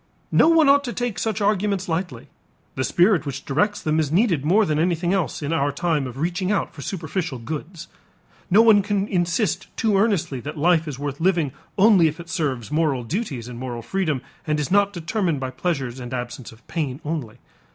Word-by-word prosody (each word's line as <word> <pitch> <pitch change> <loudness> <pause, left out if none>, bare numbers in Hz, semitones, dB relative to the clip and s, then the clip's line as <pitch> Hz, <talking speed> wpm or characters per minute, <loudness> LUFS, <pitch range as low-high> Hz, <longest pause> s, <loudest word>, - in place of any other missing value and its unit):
No - - +5
one 325 -3 +5
ought 280 0 +5
to 240 - -4
take 245 -4 -3
such 220 -3 -1
arguments 200 -1 +1
lightly. 160 -8 -3 0.5
The 130 - -2
spirit 175 +5 +3
which 140 -2 -6
directs 205 +9 0
them 155 0 +1
is 150 -2 0
needed 175 - +2
more 200 +8 +4
than 155 -4 0
anything 175 +1 +1
else 185 -5 -1
in 145 +3 -1
our 145 -3 +1
time 150 -2 0
of 125 0 -9
reaching 180 +5 -1
out 205 - -1
for 145 - -10
superficial 165 -2 -3
goods. 160 +7 -7 0.6
No 205 +5 +6
one 220 -3 +6
can 200 0 -1
insist 180 +2 0
too 220 -3 +2
earnestly 195 - +1
that 150 +5 -7
life 165 +1 +3
is 145 -4 -5
worth 145 0 -4
living 170 -6 +2 0.3
only 195 -4 +6
if 155 +2 -4
it 170 0 -9
serves 130 - -2
moral 150 -5 +1
duties 140 - -4
and 120 -1 -8
moral 120 -2 -5
freedom 155 -3 -1 0.2
and 150 0 +1
is 150 - -3
not 200 0 +4
determined 175 -3 -1
by 130 -1 -4
pleasures 130 -3 -2
and 125 0 -5
absence 125 0 -6
of 115 0 -19
pain 145 -5 -3
only. 145 -8 -4
165 Hz, 200 wpm, -23 LUFS, 140-195 Hz, 0.6 s, No